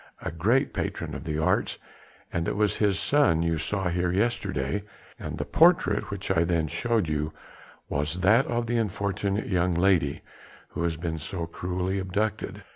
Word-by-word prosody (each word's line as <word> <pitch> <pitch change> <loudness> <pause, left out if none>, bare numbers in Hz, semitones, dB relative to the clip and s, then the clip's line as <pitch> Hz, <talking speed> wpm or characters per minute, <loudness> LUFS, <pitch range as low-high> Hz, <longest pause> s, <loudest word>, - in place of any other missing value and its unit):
"A - - -2
great 110 +11 +2
patron - - -3
of - - -6
the 75 - -2
arts... 80 - +1 0.6
it 85 0 -1
was 105 0 +1
his 100 -3 +2
son 85 - +3
you 85 -1 0
saw 95 +3 -1
here 90 0 0
yesterday, 95 - 0 0.4
and - - -5
the - - -2
portrait 165 -11 +4
which 100 -2 -4
I 85 -3 +3
then 85 -2 +1
showed 115 - 0
you 75 0 -1 0.5
was 75 +5 -2
that 115 +8 +5
of 120 0 -1
the 120 +1 0
unfortunate 100 -1 -1
young 90 -2 +1
lady 85 -6 +2 0.5
who - - -5
has 80 -2 -1
been 80 -1 -3
so 85 +3 -4
cruelly 90 +3 -2
abducted." 100 +3 -2
90 Hz, 165 wpm, -27 LUFS, 85-105 Hz, 0.6 s, that